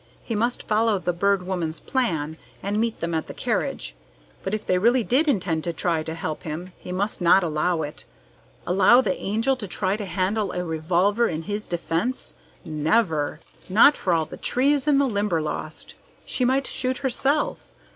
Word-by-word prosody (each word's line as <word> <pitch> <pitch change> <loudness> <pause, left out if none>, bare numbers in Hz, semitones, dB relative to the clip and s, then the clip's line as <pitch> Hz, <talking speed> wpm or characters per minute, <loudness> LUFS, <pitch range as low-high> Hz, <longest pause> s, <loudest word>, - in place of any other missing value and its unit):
He 230 - -4
must 235 +3 -1
follow 215 0 +3
the 180 -1 -1
Bird 200 +2 +2
Woman's 170 -4 -2
plan 160 - -1 0.3
and 205 +2 -1
meet 230 -1 -2
them 170 0 -2
at 160 - -1
the - - -8
carriage, - - -2 0.5
but 195 - -1
if 215 - -6
they 180 - +2
really 240 +4 +3
did 265 +8 +2
intend 180 - +1
to 170 - -1
try 165 0 0
to 160 +1 -5
help 160 -1 -4
him, 170 +4 -6
he - - -8
must 195 +2 -2
not 175 +2 +5
allow 160 +1 0
it. 150 0 -7 0.6
Allow 200 +7 +6
the 190 -7 0
Angel 225 +7 0
to 225 -6 -7
try 190 +1 -1
to 210 -1 -4
handle 195 +2 -1
a 180 0 -2
revolver 180 +8 +1
in 160 0 -3
his 205 +3 -4
defence? 175 +7 -2 0.3
Never! 155 -1 0 0.3
Not 225 +10 +7
for 185 - -1
all 165 -2 +2
the - - -10
trees 280 +2 +1
in 290 -2 +5
the 280 - +4
Limberlost! 170 - -2 0.3
She 255 - -1
might 265 +2 +2
shoot 255 0 -2
herself. 275 +3 0
190 Hz, 180 wpm, -24 LUFS, 165-230 Hz, 0.6 s, Not